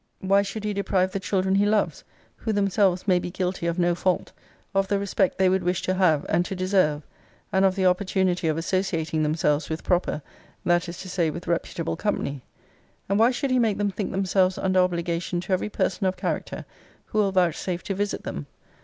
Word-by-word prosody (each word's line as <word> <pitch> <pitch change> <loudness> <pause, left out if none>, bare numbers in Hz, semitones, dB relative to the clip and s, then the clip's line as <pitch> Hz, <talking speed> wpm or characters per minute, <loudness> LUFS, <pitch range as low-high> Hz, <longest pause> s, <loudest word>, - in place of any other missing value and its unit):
Why 195 +1 +3
should 200 +2 -5
he 210 -1 -1
deprive 190 -2 +1
the 195 - -2
children 190 0 0
he 200 +1 +3
loves, 210 0 +1 0.3
who 220 - -2
themselves 200 -2 +1
may 180 -2 +4
be 175 - -4
guilty 180 -1 -2
of 170 +1 -1
no 175 -1 +3
fault, 180 +1 0 0.4
of 195 0 +2
the 200 - +1
respect 195 -1 0
they 190 - +4
would 190 +1 +2
wish 180 +1 -1
to 185 - 0
have, 175 -6 +3
and 175 +2 +2
to 195 - -4
deserve; 185 -5 +1 0.5
and 190 0 +3
of 190 -1 +3
the 190 -1 0
opportunity 185 -1 +1
of 155 0 +1
associating 165 -3 -1
themselves 150 0 +1
with 160 0 -4
proper, 175 -4 0 0.4
that 175 0 +2
is 170 +1 -8
to 185 - -8
say, 175 -3 0
with 170 +3 -6
reputable 170 -1 -2
company? 145 -10 -2 0.7
and 200 +1 +2
why 230 +2 +6
should 260 +2 -1
he 255 - +3
make 220 -4 +2
them 205 -1 0
think 195 +1 -3
themselves 190 -1 +1
under 185 -1 +2
obligation 175 -1 0
to 185 - -2
every 185 +3 0
person 195 -1 0
of 185 0 -1
character, - - -3 0.4
who 215 - -2
will 200 -2 +3
vouchsafe 180 -1 0
to 195 - -2
visit 205 +1 -2
them? 70 - -5
185 Hz, 205 wpm, -25 LUFS, 175-195 Hz, 0.7 s, why